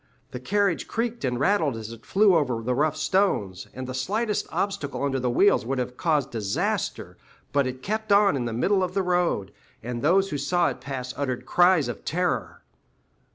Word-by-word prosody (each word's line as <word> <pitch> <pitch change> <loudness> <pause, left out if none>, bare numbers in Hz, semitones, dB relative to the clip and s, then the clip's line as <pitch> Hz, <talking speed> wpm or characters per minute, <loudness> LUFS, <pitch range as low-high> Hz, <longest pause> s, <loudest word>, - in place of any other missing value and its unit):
The 125 - -6
carriage 195 +6 0
creaked 235 +1 -3
and 125 -2 -1
rattled 160 - +2
as 110 0 -7
it 115 -1 -12
flew 200 -2 +4
over 125 -8 0
the 125 +2 0
rough 150 +4 +1
stones, 155 - 0
and 130 0 -6
the 130 - -5
slightest 210 - -1
obstacle 145 -9 -2
under 135 -1 0
the 125 -1 0
wheels 195 +12 +4
would 135 +3 -2
have 125 0 -3
caused 150 -3 0
disaster; 105 -4 -2 0.4
but 140 -2 +2
it 130 0 -6
kept 220 +1 -2
on 200 -3 +5
in 125 -3 -2
the 120 - -2
middle 190 - +1
of 185 0 -2
the 195 - +1
road, 175 - 0 0.3
and 120 0 -4
those 190 +6 +3
who 145 - -2
saw 175 +5 +2
it - - -7
pass 130 -2 -5
uttered 130 -3 -3
cries 175 +1 +4
of - - -6
terror. 180 +2 -2
145 Hz, 195 wpm, -25 LUFS, 125-190 Hz, 0.4 s, on